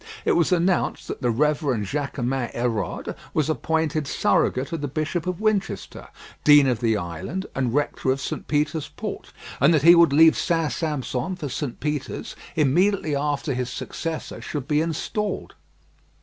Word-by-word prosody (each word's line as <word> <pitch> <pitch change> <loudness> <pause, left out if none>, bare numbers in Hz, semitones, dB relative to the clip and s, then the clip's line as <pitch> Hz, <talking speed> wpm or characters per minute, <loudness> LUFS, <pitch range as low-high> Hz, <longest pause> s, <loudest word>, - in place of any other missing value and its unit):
It - - +3
was 170 +2 +2
announced 180 +1 +1
that - - -5
the 125 - +1
Reverend 140 -3 +1
Jaquemin 135 -1 -2
Hérode 115 -6 -2 0.2
was 155 0 +2
appointed 155 -2 -1
surrogate 130 -1 +1
of 165 -3 -3
the 145 - -2
Bishop 155 +4 -2
of 180 -1 -2
Winchester, 215 -2 -2 0.4
dean 145 -1 +7
of 125 -4 +1
the 110 -2 +2
island, 85 - -4
and 130 -3 0
rector 145 -2 0
of 130 +1 +2
St. 130 - -5
Peter's 150 +1 0
Port, - - -7 0.3
and 140 +5 +5
that 145 - +1
he 170 +2 +9
would 170 -3 +6
leave 160 +3 +6
St. 165 -4 0
Sampson 150 +2 -2
for 155 -6 -5
St. 135 -1 -4
Peter's 150 -2 -4 0.2
immediately 160 +2 +2
after 145 0 -1
his 125 0 -2
successor 160 +5 -5
should 145 -4 -5
be 150 -1 +2
installed. 170 +6 -3
150 Hz, 160 wpm, -24 LUFS, 130-165 Hz, 0.4 s, he